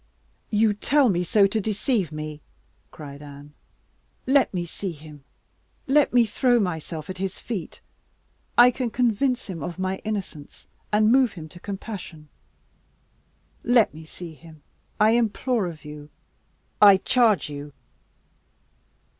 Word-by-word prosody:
"You 215 0 +3
tell 265 +5 +2
me 180 -2 +1
so 200 +3 +4
to 215 +2 0
deceive 210 - -1
me," 155 -1 -6 0.5
cried 145 -2 -10
Anne. 145 0 -12 0.7
"Let 270 +1 +3
me 175 -2 -3
see 180 +2 -5
him 150 -2 -13 0.6
let 285 +1 +3
me 240 -1 +5
throw 245 +2 +2
myself 165 -5 -3
at 185 -1 -7
his 190 -1 -3
feet! 215 -8 -6 0.8
I 245 +1 +8
can 250 -1 -3
convince 250 +2 0
him 175 -5 -7
of 170 +5 -5
my 190 0 -2
innocence 195 -9 -6 0.3
and 215 +1 +4
move 255 -2 +4
him 160 -4 -9
to 175 - -13
compassion! 190 -6 -8 1.3
Let 240 -3 +3
me 160 +1 -11
see 165 +1 -10
him, 155 -1 -16 0.4
I 215 +1 +5
implore 235 -1 +1
of 160 -3 -9
you 150 0 -10 0.7
I 200 -2 +9
charge 220 -2 +2
you!" 145 0 -7
195 Hz, 135 wpm, -24 LUFS, 160-230 Hz, 1.3 s, I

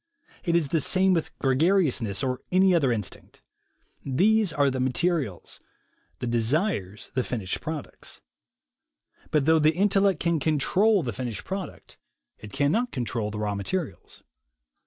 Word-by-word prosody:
It 170 -2 +1
is 160 -5 +1
the 160 0 +1
same 190 +5 +3
with 165 -3 0
gregariousness, 135 - +1
or 130 -1 -2
any 185 +1 +4
other 145 -7 +3
instinct. 105 -5 -5 0.6
These 200 +8 +2
are 145 -2 +2
the 130 - -3
materials; 130 - -1 0.6
the - - -5
desires 120 - -1
the 130 - +1
finished 105 -8 -3
products. 155 -2 -7 1.1
But 150 -2 +2
thougn 160 +2 +4
the 155 +1 +3
intellect 195 -2 +2
can 170 -2 +1
control 180 +7 +2
the 120 - -3
finished 120 -1 -5
product, 190 -1 -7 0.4
it 105 - -10
cannot 155 - +1
control 115 -3 -2
the 105 - -6
raw 105 -1 -1
materials. 135 - -5
145 Hz, 135 wpm, -26 LUFS, 120-180 Hz, 1.1 s, any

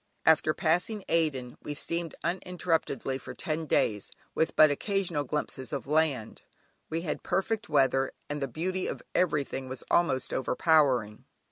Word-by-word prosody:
After 160 -1 +5
passing 180 +5 +1
Aden 140 -7 0
we 145 - -5
steamed 170 +2 -3
uninterruptedly 165 -7 -1
for - - -9
ten 155 0 -2
days 105 -7 +1 0.2
with 160 - 0
but 155 -1 +7
occasional 175 -1 0
glimpses 130 -1 -3
of 140 -3 -3
land; 145 -6 0 0.5
we 165 +1 -1
had 160 -3 -3
perfect 220 +2 -1
weather, 135 -2 +3 0.2
and 145 0 -4
the 135 - 0
beauty 180 +8 -2
of - - -5
everything 140 -6 0
was 130 -1 -6
almost 150 -7 +2
overpowering. 130 -6 +2
155 Hz, 140 wpm, -29 LUFS, 135-170 Hz, 0.5 s, but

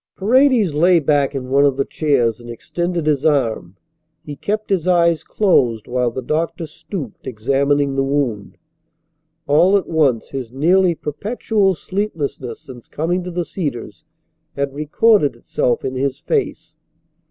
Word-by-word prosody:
Paredes 235 - +3
lay 170 +4 +4
back 145 -2 +1
in 130 -1 -5
one 140 +1 +4
of 140 -2 +2
the 135 - 0
chairs 125 -8 0
and 120 0 -12
extended 170 +8 -3
his 150 -3 +1
arm. 120 - 0 0.5
He 145 - -7
kept 210 +7 -3
his 185 -3 0
eyes 170 -3 +3
closed 120 - +1
while 125 0 0
the 130 +2 -6
doctor 160 +4 -2
stooped, 155 - -8
examining 140 +4 0
the 135 - +1
wound. 135 -7 -2 0.9
All 170 +7 +4
at 195 - -2
once 145 -8 +1
his 130 -4 -6
nearly 175 +6 +3
perpetual 195 - -1
sleeplessness 155 - -4
since 125 -3 -13
coming 175 +4 -2
to 180 - -6
the 175 0 -3
Cedars 140 - -5 0.5
had 140 -1 -2
recorded 150 - +2
itself 120 0 -1
in 130 - -2
his 135 +1 -2
face. 415 - -3
145 Hz, 145 wpm, -19 LUFS, 130-175 Hz, 0.9 s, lay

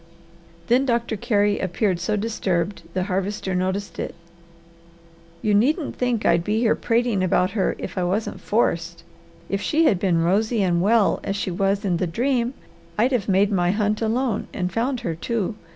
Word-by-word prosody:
Then 245 +6 +3
Doctor 235 -2 0
Carey 205 -1 +1
appeared 185 0 0
so 195 +5 -1
disturbed 200 -4 -1
the 185 - +1
Harvester 190 0 -2
noticed 190 +2 -2
it. - - -4 1.3
"You 210 - +2
needn't 285 - +2
think 245 -3 -1
I'd 170 0 +3
be 210 +4 0
here 230 -1 +3
prating 230 -4 0
about 185 +1 +2
her 200 -3 0
if - - -5
I - - 0
wasn't 195 +5 -2
FORCED. 170 -6 0 0.4
If 195 0 -2
she 315 +2 +2
had 195 - +3
been 175 -4 +2
rosy 215 +5 +2
and 175 -2 +2
well 215 +1 +3
as 195 - -2
she 200 -2 -2
was 195 +3 0
in 180 -3 +1
the 180 - -1
dream, 245 +6 0 0.4
I'd 240 +5 +3
have 230 -6 0
made 195 +2 +3
my 175 -3 +2
hunt 210 +2 0
alone 225 0 0
and 180 -2 -3
found 245 +2 -1
her, 170 -8 -2
too. 220 +5 -2
205 Hz, 175 wpm, -23 LUFS, 185-230 Hz, 1.3 s, Then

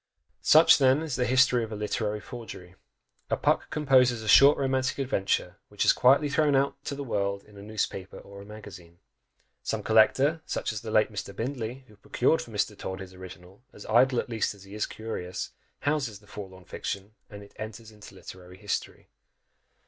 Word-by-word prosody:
Such, 155 +1 +7
then, 135 +3 +4
is 150 -5 -3
the 125 - 0
history 130 -1 +4
of 110 - -6
a - - -4
literary 105 0 -2
forgery! 105 -6 -10 0.6
A - - +1
Puck - - +1
composes 130 -6 +3
a - - -7
short 140 +7 +7
romantic 130 -1 0
adventure, 100 -8 -1
which 105 - -1
is - - +6
quietly 135 +4 +4
thrown 145 0 +2
out 140 0 0
to 140 - -3
the 140 - -5
world 100 -5 -2
in 105 - -19
a 100 - -11
newspaper 100 -2 -4
or 100 0 -12
a - - -12
magazine; 95 -5 -12 0.6
some - - -3
collector, 135 +8 +3
such - - -2
as 110 - -5
the 115 - -7
late 110 0 +2
Mr. 100 -1 -6
Bindley, 125 +1 -4
who 105 - -19
procured 130 +9 +1
for - - -10
Mr. 105 -1 -1
Todd 95 -1 -6
his 95 -1 -9
original, 95 +2 -12
as 105 - -12
idle 125 +3 +3
at - - -3
least 115 -3 -2
as 100 - -16
he 100 0 -13
is 105 - -2
curious, 100 -5 -6 0.3
houses 140 -8 -1
the 105 - -21
forlorn 95 -3 -10
fiction 100 +2 -6 0.2
and 105 -1 -10
it 100 - -17
enters 110 +1 -8
into 105 -2 -14
literary 90 0 -12
history! 100 -10 -5
110 Hz, 190 wpm, -27 LUFS, 100-130 Hz, 0.6 s, Such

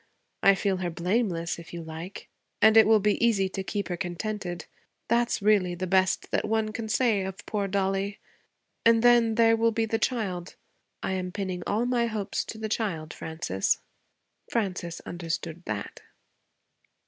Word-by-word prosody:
I 195 - +6
feel 195 -1 0
her 180 -1 -2
blameless 175 -1 -1
if 170 +1 -10
you 170 - -5
like. 160 +4 -8 0.3
And 220 +1 +6
it 220 -1 +8
will 220 -1 +6
be 210 +2 +1
easy 205 -5 +3
to 190 0 -4
keep 200 +1 -3
her 175 - -3
contented. 180 -1 -4 0.4
That 235 +1 +3
is - - -2
really 200 -4 +3
the 185 +2 -3
best 185 0 +1
that - - +1
one 220 0 0
can 220 -1 -4
say 220 -3 +2
of 190 +1 -7
poor 205 -2 -1
Dollie. 195 +1 -1 0.7
And 230 0 +5
then, 240 -2 +5
there 225 0 +5
will 230 0 +3
be 225 0 0
the 225 0 -1
child. 195 -8 -2 0.5
I - - -1
am 185 -1 -2
pinning 190 -2 -3
all 220 +4 +1
my 245 -1 +1
hopes 215 -3 -2
to 220 - -7
the 220 0 -3
child, 185 -8 -2
Frances.' 160 - -1 0.7
Frances 180 -6 -2
understood 170 -1 -4
that. 105 -1 -5
200 Hz, 170 wpm, -27 LUFS, 180-220 Hz, 0.7 s, it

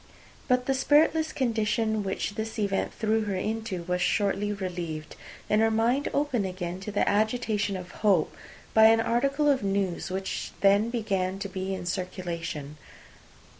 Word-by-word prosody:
But 250 0 +2
the 270 - +1
spiritless 310 +3 +3
condition 220 -3 0
which 195 0 -2
this 220 +2 -5
event 200 -2 0
threw 220 0 0
her 200 -2 -2
into 215 -2 -3
was 180 +1 -1
shortly 200 +2 +1
relieved, 175 -6 -5 0.3
and 210 +1 +3
her 225 - +4
mind 235 +5 +1
opened 265 -9 0
again 180 -1 -5
to 200 +2 -6
the 205 - +1
agitation 215 -1 +1
of 180 -1 -9
hope, 195 -7 +1 0.4
by 220 0 +7
an 225 0 +6
article 275 +6 +1
of 275 -3 +3
news 195 -2 -1
which 190 +1 -4
then 200 +3 +4
began 195 -5 -1
to 200 - -4
be 190 0 -3
in 180 - -6
circulation. 170 -5 -4
205 Hz, 155 wpm, -27 LUFS, 185-225 Hz, 0.4 s, by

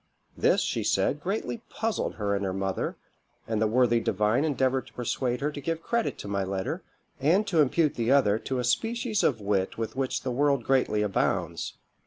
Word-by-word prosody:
This, - - +3
she - - -1
said, 150 - +1
greatly 215 +5 -3
puzzled 225 0 -2
her 100 -2 0
and 100 - -2
her 95 -1 -2
mother, 95 0 -2 0.5
and 110 -1 -1
the 110 - +4
worthy 120 +1 +3
divine 105 +5 +1
endeavoured 135 -3 +1
to - - -17
persuade 125 +1 -2
her 145 +2 0
to 145 - -7
give 165 +3 -3
credit 235 -1 -1
to - - -7
my 100 -1 -1
letter, 95 0 -3 0.4
and 170 +10 +3
to 170 -6 +3
impute 150 +2 +2
the 120 +1 0
other 110 -7 +4
to 130 - -3
a 125 - -1
species 225 - 0
of 120 -6 +2
wit 100 -2 0
with 115 0 -3
which 130 -1 -1
the 130 - -2
world 140 0 +2
greatly 125 -5 +2
abounds. 100 -2 -1
130 Hz, 195 wpm, -27 LUFS, 105-150 Hz, 0.5 s, the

